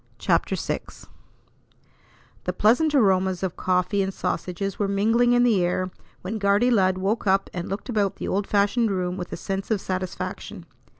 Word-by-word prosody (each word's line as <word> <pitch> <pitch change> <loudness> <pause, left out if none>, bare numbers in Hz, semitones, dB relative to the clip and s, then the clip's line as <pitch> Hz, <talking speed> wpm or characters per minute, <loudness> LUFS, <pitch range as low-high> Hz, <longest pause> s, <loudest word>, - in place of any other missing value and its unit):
CHAPTER - - +1
VI - - -2 1.7
The - - -1
pleasant 290 +8 +3
aromas 190 -6 +2
of 185 -2 -2
coffee 185 +2 +1
and 190 0 -1
sausages 185 +1 -3
were 205 - +1
mingling 225 +5 +3
in 245 0 +4
the 215 -7 +3
air 180 +1 -1 0.3
when 215 +4 -3
"Guardy 205 +5 +3
Lud" 190 -4 +3
woke 200 +4 -1
up 195 +1 +2
and 175 -1 -4
looked 195 +2 -5
about 205 -5 0
the - - -5
old 195 +1 -1
fashioned 210 +3 +2
room 180 -2 -1
with 180 -2 -6
a - - -4
sense 195 0 -4
of 220 -3 +1
satisfaction. 185 -1 -5
195 Hz, 170 wpm, -24 LUFS, 185-215 Hz, 1.7 s, in